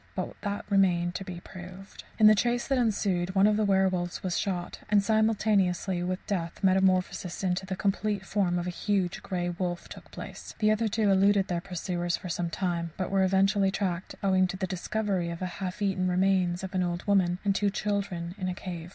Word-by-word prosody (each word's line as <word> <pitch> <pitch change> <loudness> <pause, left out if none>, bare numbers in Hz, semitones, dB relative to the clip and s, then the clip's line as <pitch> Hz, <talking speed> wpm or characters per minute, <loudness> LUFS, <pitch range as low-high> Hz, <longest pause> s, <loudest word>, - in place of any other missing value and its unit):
But - - -3
that 205 -1 -3
remained 180 -4 +2
to 195 - -4
be 180 -2 -7
proved. 185 +2 -11
In 215 - +5
the 215 - +9
chase 240 +3 0
that 270 -2 +2
ensued 195 -5 0
one 195 +1 +5
of 210 0 +4
the 215 - +1
werwolves 190 -3 +1
was 185 -2 -1
shot, 180 -3 -2
and, 205 -1 +4
simultaneously 205 -4 +2
with 185 +1 -3
death, 175 -2 -3
metamorphosis 185 -1 +2
into 185 0 -1
the 190 - -2
complete 200 0 -1
form 190 -4 +1
of 175 - -2
a 180 - -2
huge 190 -1 -1
grey 175 -2 -2
wolf 175 0 -3
took - - -11
place. - - -9
The 215 -1 +3
other 220 +1 +1
two 215 -1 +2
eluded 195 0 +3
their 175 -1 -1
pursuers 175 -1 -2
for 185 - -8
some 170 0 -2
time, 170 -2 -2
but 185 0 -3
were 195 -1 +3
eventually 195 +1 +3
tracked 190 -2 -2
owing 185 -1 +3
to 190 - -5
the 190 - -1
discovery 190 0 -2
of 170 - -4
the 185 - -4 0.2
half 190 +2 -3
eaten 190 -2 +1
remains 185 -1 +2
of 190 +1 -5
an 185 - +1
old 175 0 -2
woman 185 -3 +3
and 200 - +3
two 205 +1 +1
children 195 -4 -2
in 185 - -2
a 180 - -3
cave. 175 -3 -7
190 Hz, 205 wpm, -28 LUFS, 180-200 Hz, 0.2 s, the